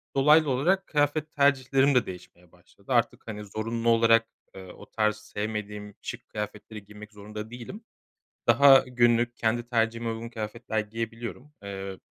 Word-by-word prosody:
Dolaylı 150 Hz, +2 st, +5 dB
olarak 180 Hz, +9 st, +1 dB
kıyafet 150 Hz, +1 st, 0 dB
tercihlerim 135 Hz, -1 st, +3 dB
de 125 Hz, -, +4 dB
değişmeye 90 Hz, -1 st, -11 dB
başladı. -, -, -16 dB
Artık, -, -, 0 dB
hani, 105 Hz, -1 st, -6 dB
zorunlu 115 Hz, +3 st, -2 dB
olarak, 115 Hz, 0 st, +4 dB, 0.3 s
eee, 95 Hz, -1 st, -10 dB
o -, -, -13 dB
tarz 110 Hz, -1 st, +1 dB
sevmediğim 105 Hz, -1 st, -6 dB
şık -, -, -8 dB
kıyafetleri 105 Hz, 0 st, -7 dB
giymek 105 Hz, +1 st, -12 dB
zorunda 105 Hz, +1 st, -8 dB
değilim. 125 Hz, -, -9 dB, 0.7 s
Daha 140 Hz, -1 st, +8 dB
günlük, 120 Hz, -1 st, +2 dB
kendi 120 Hz, +1 st, -1 dB
tercihime 115 Hz, -1 st, 0 dB
uygun 115 Hz, +1 st, -5 dB
kıyafetler 110 Hz, 0 st, -4 dB
giyebiliyorum. 115 Hz, +6 st, -6 dB
Eee, 95 Hz, -1 st, -6 dB
115 Hz, 140 wpm, -27 LUFS, 105-125 Hz, 0.7 s, Daha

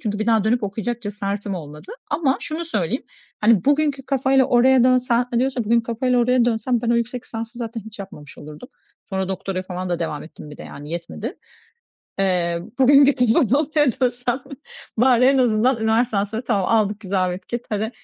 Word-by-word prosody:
Çünkü 210 Hz, -3 st, -2 dB
bir 215 Hz, -, -2 dB
daha 225 Hz, -3 st, +3 dB
dönüp 235 Hz, +1 st, +1 dB
okuyacak 220 Hz, +4 st, -3 dB
cesaretim 205 Hz, -1 st, -4 dB
olmadı. 150 Hz, -, -9 dB, 0.2 s
Ama 290 Hz, -3 st, +1 dB
şunu 315 Hz, +2 st, -4 dB
söyleyeyim, 225 Hz, -, -2 dB, 0.4 s
hani, 215 Hz, -3 st, +4 dB
bugünkü 285 Hz, -1 st, +1 dB
kafayla 270 Hz, -1 st, +3 dB
oraya 250 Hz, +1 st, +4 dB
dönsen, 250 Hz, -1 st, +2 dB
hani, 235 Hz, -, +1 dB
diyorsan 260 Hz, -2 st, 0 dB
ki -, -, -11 dB
bugünkü 235 Hz, 0 st, +3 dB
kafayla 245 Hz, +2 st, 0 dB
oraya 245 Hz, 0 st, +3 dB
dönsem 240 Hz, +1 st, 0 dB
ben 235 Hz, -, 0 dB
o 235 Hz, -, +3 dB
yüksek 235 Hz, +1 st, -2 dB
lisansı 230 Hz, +2 st, -7 dB
zaten 230 Hz, -1 st, -5 dB
hiç 220 Hz, 0 st, -12 dB
yapmamış 150 Hz, -7 st, -10 dB
olurdum. 150 Hz, +11 st, -11 dB, 0.4 s
Sonra 190 Hz, -1 st, -2 dB
doktoraya 190 Hz, 0 st, -3 dB
falan 185 Hz, 0 st, -5 dB
da 175 Hz, -1 st, -1 dB
devam 160 Hz, -3 st, -3 dB
ettim 155 Hz, -1 st, -12 dB
bir 150 Hz, -, -10 dB
de, -, -, -10 dB
yani, 145 Hz, +1 st, -10 dB
yetmedi. 170 Hz, 0 st, -6 dB, 0.8 s
Eee, 175 Hz, -3 st, 0 dB, 0.2 s
bugün 275 Hz, +2 st, +7 dB
gidip 250 Hz, -5 st, +3 dB
o 240 Hz, -, +3 dB
noktaya 295 Hz, +2 st, +2 dB
dönsem 245 Hz, +1 st, -1 dB, 0.6 s
bari 250 Hz, 0 st, +4 dB
en 270 Hz, +1 st, +4 dB
azından 245 Hz, +1 st, +3 dB
üniversiteden 220 Hz, -2 st, +1 dB
sonra 220 Hz, +4 st, -5 dB
tamam 200 Hz, -6 st, 0 dB
aldık, 215 Hz, -2 st, +1 dB
güzel 190 Hz, -3 st, 0 dB
bir 180 Hz, -, -3 dB
etiket 235 Hz, +6 st, -6 dB
hadi, 215 Hz, +1 st, -2 dB
230 Hz, 190 wpm, -21 LUFS, 195-250 Hz, 0.8 s, bugün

